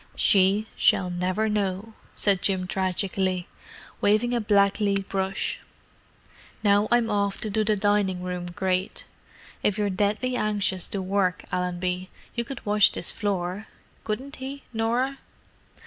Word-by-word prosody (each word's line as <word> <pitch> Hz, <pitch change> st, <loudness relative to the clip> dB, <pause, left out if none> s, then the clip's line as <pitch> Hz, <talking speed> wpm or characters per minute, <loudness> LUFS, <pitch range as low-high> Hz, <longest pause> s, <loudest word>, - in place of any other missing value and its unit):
"She 200 Hz, 0 st, +4 dB
shall 180 Hz, -1 st, +3 dB
never 185 Hz, +5 st, 0 dB
know," 205 Hz, 0 st, -1 dB, 0.2 s
said 195 Hz, -3 st, +2 dB
Jim 190 Hz, -2 st, 0 dB
tragically, 185 Hz, -1 st, -1 dB, 0.5 s
waving 215 Hz, +4 st, +3 dB
a 240 Hz, -, +1 dB
blacklead 200 Hz, -1 st, +2 dB
brush. 195 Hz, 0 st, -1 dB, 1.0 s
"Now 205 Hz, 0 st, +4 dB
I'm 235 Hz, -2 st, +3 dB
off 200 Hz, -1 st, 0 dB
to 215 Hz, -, -2 dB
do 215 Hz, +1 st, +1 dB
the 215 Hz, 0 st, +2 dB
dining 200 Hz, -3 st, +1 dB
room 180 Hz, -1 st, -4 dB
grate. 185 Hz, +1 st, -2 dB, 0.6 s
If 210 Hz, 0 st, +1 dB
you're 205 Hz, -1 st, 0 dB
deadly 210 Hz, +6 st, 0 dB
anxious 205 Hz, -5 st, 0 dB
to 195 Hz, -2 st, -3 dB
work, 185 Hz, -1 st, 0 dB
Allenby, 180 Hz, +1 st, -2 dB, 0.2 s
you 235 Hz, -, -1 dB
could 250 Hz, +2 st, -8 dB
wash 210 Hz, 0 st, +5 dB
this -, -, -1 dB
floor—couldn't 205 Hz, +6 st, -4 dB
he, 270 Hz, +1 st, -7 dB
Norah?" 240 Hz, +5 st, 0 dB
200 Hz, 130 wpm, -26 LUFS, 185-215 Hz, 1.0 s, wash